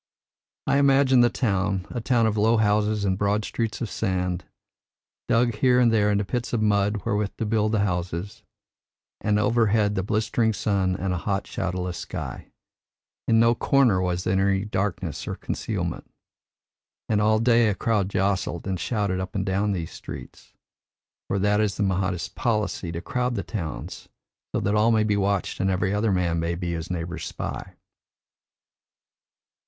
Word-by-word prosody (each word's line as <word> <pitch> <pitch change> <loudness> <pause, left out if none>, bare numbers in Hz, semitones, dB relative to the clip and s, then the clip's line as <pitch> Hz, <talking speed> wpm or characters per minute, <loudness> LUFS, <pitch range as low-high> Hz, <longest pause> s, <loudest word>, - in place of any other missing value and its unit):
I 140 - +3
imagine 135 -2 +5
the 120 - +5
town 95 -6 0
a 120 - -3
town 115 0 +2
of 110 -1 +1
low 110 +2 +3
houses 105 -1 +2
and 95 -1 0
broad 105 +1 +1
streets 115 -2 -3
of 115 - -2
sand, 90 -3 -1 0.8
dug 120 0 +3
here 125 +2 +4
and 120 -2 +4
there 105 -2 +3
into 100 0 +1
pits 120 +3 -3
for 120 - 0
mud 105 -2 +1
wherewith 105 0 -1
to 115 - -2
build 110 0 +1
the 105 - +2
houses, 90 0 -3 0.8
and 105 0 +1
overhead 105 -1 +2
the 95 - 0
blistering 110 +3 0
sun 95 -3 0
and 90 0 -2
a 90 - -2
hot 100 +2 -2
shadowless 90 -1 -3
sky. - - -6 0.8
In 115 -1 +4
no 115 +1 +5
corner 120 -6 +3
was 90 -1 -1
there 95 +1 +2
any 95 +1 0
darkness 100 -3 -3
or - - -3
concealment. - - -4 1.0
And 105 -1 +1
all 110 +1 +4
day 115 0 +4
a 105 - +1
crowd 105 -4 0
jostled 95 -3 -1
and 95 -2 -2
shouted 100 -1 -1
up 95 0 -5
and 95 -1 -1
down 100 +2 0
these 85 -4 -3
streets - - -10 0.7
for 100 - -1
that 105 +2 +2
is 105 -2 0
the 105 - +1
Mahdist 95 -2 -1
policy 105 -6 -1
to 85 0 -5
crowd 125 +2 -1
the 100 - -2
towns 85 -9 -6 0.4
so - - 0
that 100 - 0
all 105 +2 +4
may 110 -1 +3
be 105 -1 +1
watched 100 -1 0
and 95 - +1
every 95 +1 0
other 105 +1 +1
man 85 -3 +1
may 85 +1 -1
be 85 0 -3
his 85 0 -4
neighbour's 85 -2 -4
spy. - - -6
105 Hz, 170 wpm, -25 LUFS, 95-110 Hz, 1.0 s, imagine